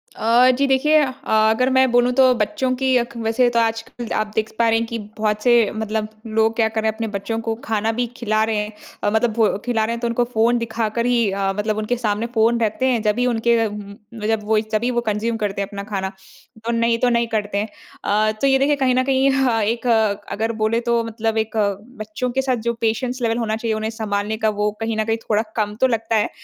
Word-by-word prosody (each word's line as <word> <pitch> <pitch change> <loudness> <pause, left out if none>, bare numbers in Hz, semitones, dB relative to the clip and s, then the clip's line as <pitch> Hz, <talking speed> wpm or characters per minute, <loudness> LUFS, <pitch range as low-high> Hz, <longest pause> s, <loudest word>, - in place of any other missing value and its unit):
अ, 240 +3 +4
जी 280 - +2
देखिए 285 +4 +3
अ, 275 - +1 0.4
अगर 255 +4 +2
मैं 260 -1 +4
बोलूँ 245 +1 +3
तो 260 -1 +6
बच्चों 260 -2 -1
की 260 0 +1
अक 240 -1 -2
वैसे 230 +2 +2
तो 235 -1 +1
आजकल 225 +1 -2
आप 215 0 -1
देख 220 0 -1
पा 230 - +4
रहे 225 - +3
हैं 230 - -1
कि 235 - -4 0.2
बहुत 210 0 -1
से 240 -4 +4
मतलब 220 0 -2 0.3
लोग 225 0 +3
क्या 225 -2 +3
कर 220 0 -2
रहे 220 - +1
हैं 220 - -3
अपने 225 0 -3
बच्चों 225 +3 -3
को 225 - +1
खाना 220 0 0
भी 245 - +2
खिला 215 -2 +1
रहे 220 0 -1
हैं। 210 0 -2 0.3
अ, - - +2
मतलब 220 +1 +2
वो 225 -1 +3 0.2
खिला 235 -3 +1
रहे 230 - -2
हैं 235 - -4
तो 240 - 0
उनको 235 +1 +1
फ़ोन 230 +2 +3
दिखा 225 -1 -2
कर 235 0 0
ही 235 -3 +2
अ, 195 0 0
मतलब 215 +1 -1
उनके 215 +3 -1
सामने 215 -1 -1
फ़ोन 230 +2 +3
रहते 225 +4 0
हैं 245 -3 +2
जब 210 +2 0
ही 245 - +2
उनके 235 -1 +2
अ, 225 - +2
उम, 205 -1 -8 0.3
जब 220 -1 0
वो 215 0 +2
तभी 240 +4 +1
वो 240 - 0
कंज़्यूम 225 +2 -1
करते 200 -2 -2
हैं 195 - -2
अपना 200 -1 -6
खाना। 190 -2 -2 0.5
तो 235 - 0
नहीं 230 0 +2
तो 250 - +3
नहीं 235 -1 +1
करते 210 -2 -2
हैं। 210 +2 -1 0.4
अ, 215 +1 +2
तो 275 - +3
ये 270 0 +4
देखिए 290 +2 +3
कहीं 260 -3 +1
न 255 - +3
कहीं 270 0 +2
ह 260 -4 +2
एक 235 +2 -3 0.5
अगर 220 +3 -1
बोले 220 +2 +2
तो 235 -1 +1
मतलब 225 0 -2
एक 220 0 -2 0.4
बच्चों 215 +4 -3
के 265 +2 0
साथ 260 -1 0
जो 235 - +2
पेशेंस 245 +3 -1
लेवल 230 -1 +1
होना 220 -2 -1
चाहिए 225 0 -2
उन्हें 215 0 -2
सँभालने 215 -1 -2
का 220 0 +1
वो 210 0 0
कहीं 225 0 -2
न 220 - +1
कहीं 225 0 0
थोड़ा 215 0 +3
कम 210 -2 -1
तो 260 - +6
लगता 225 -1 -1
है। 215 - +2
225 Hz, 245 wpm, -21 LUFS, 215-240 Hz, 0.5 s, तो